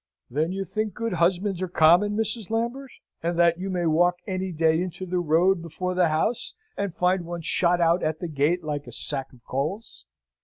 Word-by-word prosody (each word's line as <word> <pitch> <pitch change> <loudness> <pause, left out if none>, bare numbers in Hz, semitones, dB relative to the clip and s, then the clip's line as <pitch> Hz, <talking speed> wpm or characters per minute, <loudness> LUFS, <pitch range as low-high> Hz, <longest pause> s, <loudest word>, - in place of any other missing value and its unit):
"Then 155 +6 0
you 195 +1 -2
think 215 +3 -3
good 230 -3 -2
husbands 180 +2 +1
are 185 - -1
common, 180 +5 +4
Mrs. 225 -2 -2
Lambert, 235 +4 -2 0.3
and 170 +1 -1
that 170 0 +4
you 195 +1 -3
may 180 -2 -1
walk 175 +3 +3
any 190 -2 -3
day 160 0 +2
into 180 0 -5
the 180 0 -1
road 175 +3 +3
before 170 +3 -4
the 180 -1 +3
house 160 - -1 0.2
and 200 -4 -3
find 180 0 +1
one 170 0 -6
shot 175 +2 +2
out 170 +1 +3
at 155 0 -1
the 175 - -4
gate 160 +3 0
like 145 -1 -4
a - - -8
sack 135 -2 -1
of 120 -3 -20
coals?" 140 - -4
175 Hz, 200 wpm, -25 LUFS, 160-190 Hz, 0.3 s, common